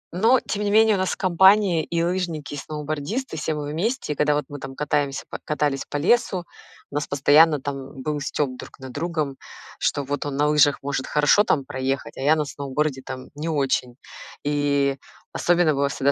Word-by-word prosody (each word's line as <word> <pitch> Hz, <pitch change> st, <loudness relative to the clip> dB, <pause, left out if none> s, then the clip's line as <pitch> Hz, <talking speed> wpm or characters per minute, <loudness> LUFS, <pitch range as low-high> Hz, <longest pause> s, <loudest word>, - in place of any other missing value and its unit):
Но 230 Hz, +6 st, +4 dB
тем 210 Hz, 0 st, -3 dB
не 205 Hz, -, 0 dB
менее 220 Hz, +1 st, +5 dB
у 190 Hz, -, 0 dB
нас 185 Hz, -, 0 dB
компания- 190 Hz, -1 st, +4 dB
и 170 Hz, 0 st, -1 dB
лыжники, 170 Hz, -5 st, -2 dB
и -, -, -4 dB
сноубордисты, 155 Hz, -, -4 dB
все 155 Hz, 0 st, -2 dB
мы 145 Hz, 0 st, -4 dB
вместе. 195 Hz, -, -1 dB
И -, -, -12 dB
когда 150 Hz, 0 st, +2 dB
вот 150 Hz, -, -1 dB
мы 145 Hz, -1 st, -8 dB
там 135 Hz, 0 st, -8 dB
катаемся 140 Hz, -2 st, -1 dB
по -, -, -7 dB
катались 150 Hz, -2 st, -1 dB
по 145 Hz, -, -2 dB
лесу, 180 Hz, +1 st, +2 dB, 0.5 s
у -, -, -9 dB
нас 150 Hz, -, -1 dB
постоянно 145 Hz, +2 st, +5 dB
там 135 Hz, -1 st, -6 dB
был 150 Hz, -1 st, -2 dB
стёб 140 Hz, -1 st, -2 dB
друг -, -, -11 dB
над 130 Hz, -1 st, -9 dB
другом, 155 Hz, -3 st, -3 dB, 0.4 s
что 145 Hz, -, 0 dB
вот 145 Hz, +2 st, -3 dB
он 140 Hz, -1 st, -4 dB
на 150 Hz, -, +3 dB
лыжах 150 Hz, -2 st, +3 dB
может 140 Hz, -1 st, -2 dB
хорошо 150 Hz, +8 st, +4 dB
там 140 Hz, -9 st, +1 dB
проехать, 135 Hz, +1 st, -3 dB
а -, -, -6 dB
я 150 Hz, +3 st, +4 dB
на 150 Hz, -1 st, -1 dB
сноуборде 140 Hz, 0 st, -2 dB
там 130 Hz, 0 st, -8 dB
не 150 Hz, +3 st, -4 dB
очень. 135 Hz, -5 st, 0 dB, 0.5 s
И 140 Hz, -1 st, +1 dB, 0.3 s
особенно 175 Hz, -3 st, +2 dB
было 140 Hz, 0 st, +1 dB
всегда 140 Hz, 0 st, +1 dB
150 Hz, 195 wpm, -23 LUFS, 140-170 Hz, 0.5 s, менее